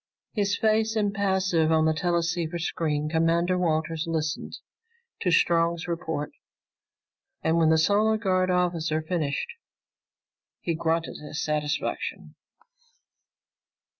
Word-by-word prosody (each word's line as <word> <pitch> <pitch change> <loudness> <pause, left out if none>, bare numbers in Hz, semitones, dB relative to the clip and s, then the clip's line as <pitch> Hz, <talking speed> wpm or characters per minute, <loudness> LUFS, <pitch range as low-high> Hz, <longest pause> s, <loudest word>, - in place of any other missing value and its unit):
His 200 -2 0
face 220 0 +2
impassive 190 -6 +1
on 160 0 +4
the 160 - +3
teleceiver 170 0 -1
screen, 155 -3 -1
Commander 165 +3 +2
Walters 165 -2 0
listened 160 -1 -2 0.6
to 180 - 0
Strong's 170 0 +2
report, 160 -4 -3 1.1
and 160 +1 +2
when 160 -1 +4
the 160 - +5
Solar 210 +6 +3
Guard 185 -4 +1
officer 170 -3 0
finished, 160 - -2 1.1
he 170 - -2
grunted 165 0 -1
his 150 0 -4
satisfaction. 150 -1 -2
170 Hz, 105 wpm, -26 LUFS, 160-185 Hz, 1.1 s, the